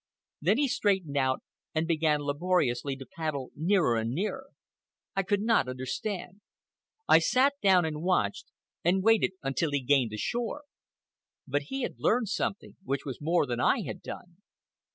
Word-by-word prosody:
Then 190 +9 +3
he 285 0 +2
straightened 190 - 0
out 130 -2 +1 0.3
and 160 +1 +1
began 155 -3 +2
laboriously 145 -3 0
to 135 0 -9
paddle 155 -5 -4
nearer 165 - +2
and 110 0 -1
nearer. 215 - -3 0.7
I 195 - +2
could 200 +1 0
not 225 - +3
understand. 180 - -4 0.7
I - - +7
sat 260 - +3
down 185 -4 +5
and 155 -1 -3
watched 170 - 0 0.4
and 185 +3 +2
waited 225 -3 +4
until 135 +4 0
he 140 -2 -1
gained 130 -2 +3
the 110 - -6
shore. 240 - -2 0.8
But 145 +2 0
he 270 -1 -2
had - - -4
learned 225 -2 +2
something, 200 -1 -3
which 140 -6 -2
was 135 -1 -6
more 165 +1 +2
than 120 -3 -3
I - - +3
had - - -6
done. 175 -1 -9
165 Hz, 160 wpm, -29 LUFS, 140-200 Hz, 0.8 s, I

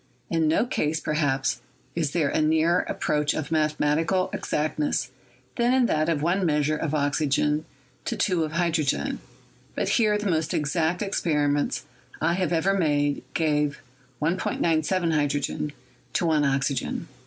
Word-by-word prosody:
In 165 -2 +2
no 160 +9 +3
case, 160 -9 -1
perhaps, 145 -4 0 0.3
is 165 -4 0
there 150 -1 +1
a - - +1
nearer 160 +3 +3
approach 150 0 0
to 155 -3 -3
mathematical 155 +4 +1
exactness 150 -4 -1 0.5
than 240 +2 +3
in 260 -2 +4
that 155 -6 +1
of 155 -3 0
one 180 +4 +1
measure 150 -2 +2
of 155 0 -2
oxygen 150 +1 +1 0.4
to - - -2
two 180 -4 +1
of 155 0 -4
hydrogen; 170 - 0 0.6
but - - -1
here 215 -3 +3
the 210 0 -3
most 160 -1 0
exact 160 +5 0
ex 200 - -2
periments 145 -3 +1 0.4
I 170 - +2
have 185 0 0
ever 175 +4 +2
made 145 -6 +1
gave 150 -2 +1 0.4
1.97 165 +1 +1
hydrogen 145 0 -1 0.4
to - - +1
1 155 -3 +3
oxy 135 0 +1
gen." 130 - -3
155 Hz, 145 wpm, -25 LUFS, 150-170 Hz, 0.6 s, in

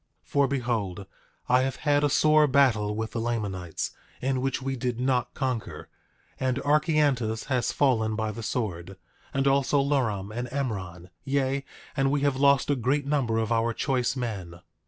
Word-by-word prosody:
9:2 - - -33
For 140 -1 +3
behold, 115 -8 -2 0.4
I 125 +1 +4
have 135 0 -1
had 145 -1 +1
a 145 - +3
sore 155 +1 +5
battle 120 -7 +3
with 110 0 -3
the 115 - -3
Lamanites, 100 -7 -3 0.3
in 130 0 -1
which 135 0 -1
we 135 0 -3
did 125 -1 -2
not 125 -1 0
conquer; 130 -4 -3 0.5
and 130 -1 0
Archeantus 145 -7 +2
has 125 -3 +1
fallen 110 -6 +2
by 110 -1 -1
the 115 - -7
sword, 95 -6 -3 0.3
and 135 -2 0
also 140 +1 +3
Luram 110 -8 0
and 120 +1 -3
Emron; 95 -10 -4
yea, 135 0 0 0.3
and 135 -1 +2
we 145 0 +1
have 140 -1 +2
lost 140 +1 +3
a - - +3
great 135 +4 0
number 135 -6 0
of 115 0 -1
our 115 0 +2
choice 130 0 0
men. 95 -9 -5
125 Hz, 170 wpm, -27 LUFS, 110-140 Hz, 0.5 s, sore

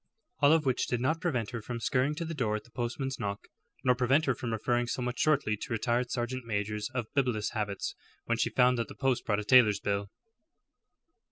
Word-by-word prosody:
All 145 0 +6
of 160 -2 +4
which 130 -2 +1
did 125 - -1
not 155 +7 0
prevent 125 - -1
her 120 -2 -4
from 120 +2 -5
scurrying 130 +5 +1
to 165 - -3
the 165 - -4
door 115 -8 0
at 105 - -4
the 120 - -21
postman's 130 +3 -3
knock, 100 -2 -4 0.4
nor 125 - +5
prevent 130 +5 +2
her 135 - +2
from 120 -1 -4
referring 120 +2 0
somewhat 125 0 -3
shortly 145 -8 +2
to 120 - -7
retired 120 +2 0
sergeant 125 +1 -2
majors 105 -1 -2
of 120 -3 -1
bibulous 125 -6 0
habits 105 -3 -3 0.3
when - - 0
she - - +2
found 125 0 +3
that 115 - -1
the - - -11
post 135 -3 0
brought 105 -2 +2
a - - -3
tailor's 110 -3 +6
bill. 100 0 -2
120 Hz, 210 wpm, -30 LUFS, 110-130 Hz, 0.4 s, All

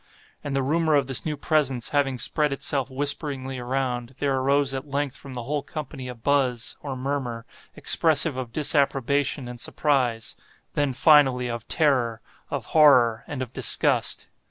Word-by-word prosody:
And 145 -2 -4
the 135 - 0
rumor 160 +2 +1
of 140 -2 +2
this 135 +3 0
new 150 -1 -3
presence 135 -6 0
having 135 -3 0
spread 150 +4 0
itself 135 -1 -1
whisperingly 135 -1 -3
around, 125 -1 -3
there 140 -2 0
arose 135 +1 +1
at 135 +2 -6
length 140 -1 -2
from 135 +1 -10
the 120 - -5
whole 145 +4 -2
company 140 -3 -8
a 125 - -7
buzz, 125 -1 0
or 140 -3 -5
murmur, 130 -3 -4 0.3
expressive 160 -2 +4
of 130 -3 -6
disapprobation 140 -1 +1
and 120 0 -8
surprise—then, 135 +1 -2
finally, 130 -3 +4
of 115 -1 -6
terror, 125 -7 +2 0.3
of - - -4
horror, 125 -8 +5
and 135 -3 -4
of 125 -1 -10
disgust. - - +2
135 Hz, 155 wpm, -24 LUFS, 125-145 Hz, 0.3 s, horror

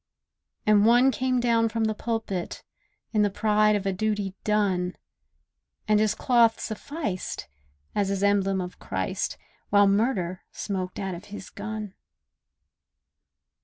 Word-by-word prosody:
And 210 -1 +5
one 245 +4 +6
came 255 +1 0
down 230 -1 +3
from 225 0 -1
the 220 0 +1
pulpit, 220 -5 -3 0.5
In 215 - +3
the 205 - +3
pride 210 +1 +3
of 200 -1 -2
a 195 - +1
duty 205 -1 -1
done, 190 -4 +1 0.9
And 215 0 +4
his 215 -1 +2
cloth 235 -3 +3
sufficed, 220 - -4 0.5
as 200 -1 +1
his 200 0 -1
emblem 195 -1 +2
of 180 0 -7
Christ, - - -3 0.3
While 205 0 +6
murder 195 -3 +1
smoked 185 -3 -4
out 190 -2 -3
of 175 +3 -8
his 205 -2 -9
gun. 215 -1 -6
210 Hz, 130 wpm, -26 LUFS, 195-225 Hz, 0.9 s, one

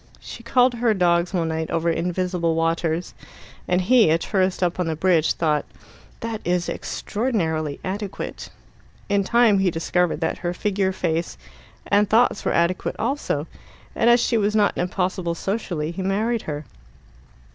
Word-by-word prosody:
She - - -10
called 250 +2 +3
to 240 - -8
her 230 -3 +2
dogs 175 -1 +2
one 170 -4 0
night 160 0 -3
over 165 0 -1
invisible 175 0 -1
waters, 165 +1 -1 0.5
and 180 0 +2
he, 225 0 +5
a 160 - +4
tourist 185 +1 0
up 175 0 0
on 180 - 0
the 160 - -1
bridge, 165 -1 +2
thought 155 -3 0 0.6
"that 225 -1 -4
is 175 0 0
extraordinarily 165 - -2
adequate." 200 +1 -5 0.6
In 200 0 +2
time 230 -1 +4
he 190 -1 +3
discovered 175 0 0
that 160 - -1
her 175 0 -3
figure, 195 -1 0
face, 170 -2 -2 0.5
and 205 0 +2
thoughts 225 -1 +3
were - - 0
adequate 170 +2 0
also, 230 - -1 0.5
and 235 - +3
as 240 +1 +6
she 230 -1 +1
was 210 +1 0
not 210 -2 +3
impossible 180 -1 -1
socially, 175 -5 -3
he 190 - -5
married 215 +5 0
her. 150 0 -4
180 Hz, 155 wpm, -23 LUFS, 165-210 Hz, 0.6 s, as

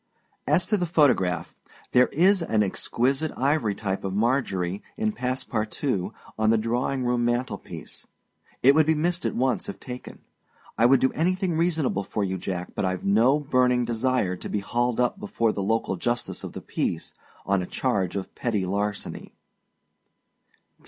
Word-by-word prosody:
As 180 -1 +3
to 210 +1 +1
the 175 -2 -1
photograph. 130 - +2 0.4
There 125 0 +5
is 185 +4 +3
an 110 -10 +2
exquisite 135 +9 0
ivory 130 -6 +1
type 95 -2 -3
of 95 -1 -3
Marjorie, 100 -6 0 0.2
in 220 0 +1
passe 130 -8 -2
partout, 110 -2 -1 0.3
on 110 0 +3
the 115 - +4
drawing 120 +4 -1
room 120 0 +1
mantel 120 +1 0
piece. - - -10 0.6
It 135 +2 +8
would 155 +1 +4
be 160 - +4
missed 170 +3 0
at - - -3
once 130 +1 0
if - - -7
taken. 125 -1 -9 0.5
I 115 +2 +5
would 135 0 +5
do 130 - +3
anything 185 +1 0
reasonable 160 - +1
for 105 - -2
you, 95 -1 -2
Jack; 90 0 -4
but - - -2
Iâve 95 -1 -1
no 115 +9 +4
burning 125 -3 +2
desire 120 -4 0
to - - -7
be - - -1
hauled 120 +3 0
up 125 -1 +1
before 110 +2 0
the 100 - -3
local 100 -1 0
justice 120 +5 -2
of - - -6
the - - -7
peace, - - -3 0.3
on 100 -1 +2
a 90 - -5
charge 100 -9 -1
of 100 - -4
petty 110 -6 -1
larceny. 100 +2 -3
120 Hz, 170 wpm, -25 LUFS, 100-140 Hz, 0.6 s, It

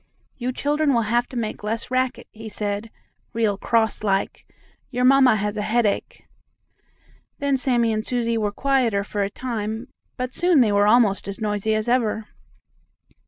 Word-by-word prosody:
"You 250 0 -3
children 290 +1 +1
will 230 - +2
have 240 +1 +2
to 255 - -8
make 220 -2 -4
less 225 +3 -3
racket," 255 0 -1
he 220 0 -9
said, 205 +1 -3 0.4
real 225 -3 +1
cross 220 +1 0
like. 195 -2 -1 0.4
"Your 250 -1 0
mamma 265 -2 +6
has 210 0 -2
a - - -1
headache." 215 -1 -1 1.1
Then 280 -1 +1
Sammie 245 -4 +1
and 215 0 -1
Susie 235 -1 -1
were 210 -2 0
quieter 245 -4 +1
for 205 0 -3
a 200 - 0
time, 225 +1 -4 0.3
but 255 0 -4
soon 345 -3 +4
they 220 -4 +3
were 205 0 +3
almost 215 -4 +3
as 200 - -5
noisy 215 0 0
as 215 +1 -2
ever. 225 -3 +1
225 Hz, 165 wpm, -23 LUFS, 210-250 Hz, 1.1 s, mamma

